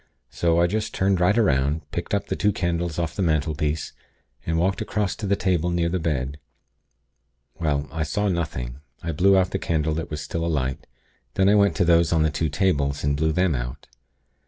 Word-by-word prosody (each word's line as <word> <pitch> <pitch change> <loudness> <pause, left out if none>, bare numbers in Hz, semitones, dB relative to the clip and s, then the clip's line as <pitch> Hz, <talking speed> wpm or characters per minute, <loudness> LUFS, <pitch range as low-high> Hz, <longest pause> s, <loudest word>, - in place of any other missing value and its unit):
So 85 -1 +1
I 85 - +5
just 105 +5 -2
turned 95 -1 +2
right 90 +5 +3
'round, 75 - +2
picked 90 +4 -2
up 100 0 -1
the - - -2
two 105 - +2
candles 85 -3 -2
off 85 -1 -2
the - - -2
mantelpiece, 75 -2 0 0.5
and 80 0 +1
walked 95 +6 +1
across 105 -3 -1
to 105 - -4
the 100 - +3
table 90 -3 0
near 85 -1 +1
the 90 +2 -1
bed. 75 -3 -2 1.2
Well, 75 -3 0
I 80 +1 -3
saw 90 +8 0
nothing. 75 -9 -3 0.2
I 85 - -2
blew 95 +5 +4
out 95 0 +2
the 95 - -1
candle 80 -3 0
that 80 +1 -4
was 75 - -4
still 85 +3 -4
alight; 65 -6 -2 0.5
then 95 - +3
I 100 - +5
went 100 -1 +4
to 90 - +2
those 85 -1 +4
on 80 -2 +3
the 80 - +1
two 75 +2 -1
tables, 70 -5 0
and 70 0 +1
blew 80 +2 +1
them 90 +1 +2
out. - - -5
85 Hz, 205 wpm, -24 LUFS, 75-95 Hz, 1.2 s, I